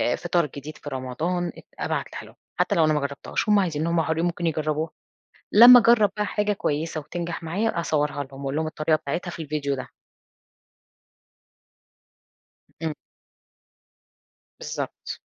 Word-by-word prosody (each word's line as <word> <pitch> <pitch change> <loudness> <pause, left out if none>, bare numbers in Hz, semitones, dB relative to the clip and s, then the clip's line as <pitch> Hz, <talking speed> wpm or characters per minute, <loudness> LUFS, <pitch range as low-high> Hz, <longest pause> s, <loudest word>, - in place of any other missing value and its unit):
فطار 175 -2 +1
جديد 145 +2 -8
في 145 - -8
رمضان، 155 +7 -2
أت - - -13
أبعتها - - -3
لهم - - -16 0.2
حتى - - +2
لو 160 -2 +4
أنا 155 - +3
ما 150 - +2
جربتهاش، 140 +9 -3
هم 210 -1 +6
عايزين 165 -4 0
هم 170 0 +2
حُرين 160 +1 0
ممكن 175 0 -2
يجربوها، 155 0 -1 0.6
لما 245 +4 +10
أجرب 225 -3 +5
بقى 210 - +1
حاجة 210 0 0
كويسة 155 -3 -2
وتنجح 170 +2 -5
معايا 180 +3 -1
أصورها 150 -3 0
لهم 135 +1 -10
وأقول 140 +3 -1
هم 160 - -1
الطريقة 155 0 +1
بتاعتها 155 +4 -3
في 170 - -7
الفيديو 145 -2 -2
ده. 130 - -6 3.0
إمم. 160 -2 -1 1.7
بالضبط. - - -5
160 Hz, 140 wpm, -25 LUFS, 150-175 Hz, 3.0 s, لما